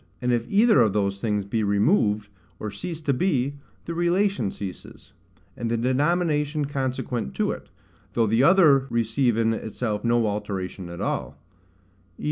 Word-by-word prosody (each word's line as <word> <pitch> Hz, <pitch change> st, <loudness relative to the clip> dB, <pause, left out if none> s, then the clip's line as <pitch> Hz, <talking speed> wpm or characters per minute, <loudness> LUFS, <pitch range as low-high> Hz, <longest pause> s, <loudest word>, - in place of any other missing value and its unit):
And 125 Hz, 0 st, 0 dB
if 120 Hz, -1 st, -1 dB
either 215 Hz, -, +5 dB
of 110 Hz, -4 st, +3 dB
those 100 Hz, -1 st, -1 dB
things 105 Hz, -3 st, -1 dB
be 110 Hz, +3 st, -1 dB
removed, 105 Hz, -, +2 dB, 0.3 s
or 105 Hz, -, -4 dB
cease 160 Hz, -, -5 dB
to 145 Hz, -3 st, +1 dB
be, 140 Hz, -3 st, 0 dB, 0.3 s
the 170 Hz, -, -4 dB
relation 175 Hz, -, +1 dB
ceases, 95 Hz, -2 st, -9 dB, 0.4 s
and 120 Hz, -1 st, -3 dB
the 115 Hz, -, 0 dB
denomination 150 Hz, +3 st, +1 dB
consequent 130 Hz, -, -3 dB
to -, -, +1 dB
it, -, -, -8 dB, 0.4 s
though 115 Hz, -, +2 dB
the 115 Hz, +3 st, +2 dB
other 145 Hz, -4 st, +5 dB
receive 115 Hz, +1 st, +1 dB
in 115 Hz, 0 st, +2 dB
itself 110 Hz, -1 st, -3 dB
no 120 Hz, -1 st, +2 dB
alteration 100 Hz, -3 st, -4 dB
at 85 Hz, -, -7 dB
all; -, -, -3 dB, 0.8 s
v. -, -, -26 dB
120 Hz, 155 wpm, -25 LUFS, 105-145 Hz, 0.8 s, either